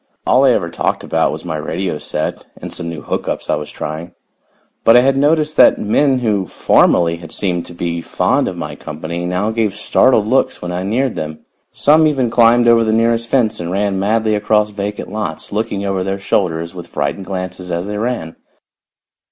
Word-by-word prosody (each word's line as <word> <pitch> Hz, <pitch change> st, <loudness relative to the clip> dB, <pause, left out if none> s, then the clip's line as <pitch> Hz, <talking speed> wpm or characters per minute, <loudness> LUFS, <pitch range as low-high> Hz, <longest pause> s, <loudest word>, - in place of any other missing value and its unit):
All 130 Hz, +2 st, +4 dB
I -, -, +6 dB
ever 85 Hz, -9 st, +1 dB
talked -, -, -1 dB
about -, -, +1 dB
was -, -, -7 dB
my 80 Hz, -3 st, -3 dB
radio 85 Hz, +1 st, -3 dB
set 75 Hz, -, -4 dB
and -, -, -7 dB
some 85 Hz, -2 st, -4 dB
new 80 Hz, -3 st, -6 dB
hook -, -, -3 dB
ups -, -, -2 dB
I -, -, +3 dB
was -, -, -6 dB
trying, 80 Hz, +3 st, -6 dB, 0.7 s
but 115 Hz, +1 st, +7 dB
I -, -, +7 dB
had 135 Hz, +1 st, +2 dB
noticed 150 Hz, +2 st, +1 dB
that -, -, +6 dB
men 130 Hz, +6 st, +2 dB
who 105 Hz, -6 st, 0 dB
formerly 85 Hz, +1 st, +3 dB
had 85 Hz, -1 st, -11 dB
seemed 90 Hz, -3 st, -1 dB
to 90 Hz, -, -10 dB
be 85 Hz, -1 st, -3 dB
fond -, -, 0 dB
of -, -, -4 dB
my -, -, -5 dB
company 85 Hz, +3 st, -5 dB
now 90 Hz, +5 st, -1 dB
gave 110 Hz, -3 st, -1 dB
startled 110 Hz, -2 st, +3 dB
looks 130 Hz, +4 st, +1 dB
when 90 Hz, -, -5 dB
I 90 Hz, +1 st, -3 dB
neared 115 Hz, +7 st, 0 dB
them. 80 Hz, 0 st, -6 dB, 0.3 s
Some 155 Hz, +2 st, +4 dB
even 130 Hz, -6 st, 0 dB
climbed 120 Hz, +1 st, +4 dB
over 115 Hz, -1 st, +5 dB
the 110 Hz, -, +1 dB
nearest 115 Hz, +1 st, +1 dB
fence 110 Hz, -4 st, +1 dB
and 85 Hz, 0 st, -4 dB
ran 100 Hz, 0 st, 0 dB
madly 110 Hz, +2 st, +1 dB
across 105 Hz, 0 st, +1 dB
vacant 100 Hz, -1 st, -5 dB
lots, 105 Hz, -7 st, -5 dB
looking 105 Hz, -1 st, -2 dB
over 95 Hz, -1 st, -1 dB
their 95 Hz, +1 st, -2 dB
shoulders 85 Hz, -4 st, -1 dB
with 90 Hz, -2 st, -9 dB
frightened 70 Hz, +6 st, -3 dB
glances 90 Hz, -1 st, -5 dB
as 85 Hz, +1 st, -2 dB
they 105 Hz, 0 st, -4 dB
ran. 110 Hz, -9 st, -3 dB
100 Hz, 200 wpm, -17 LUFS, 85-115 Hz, 0.7 s, but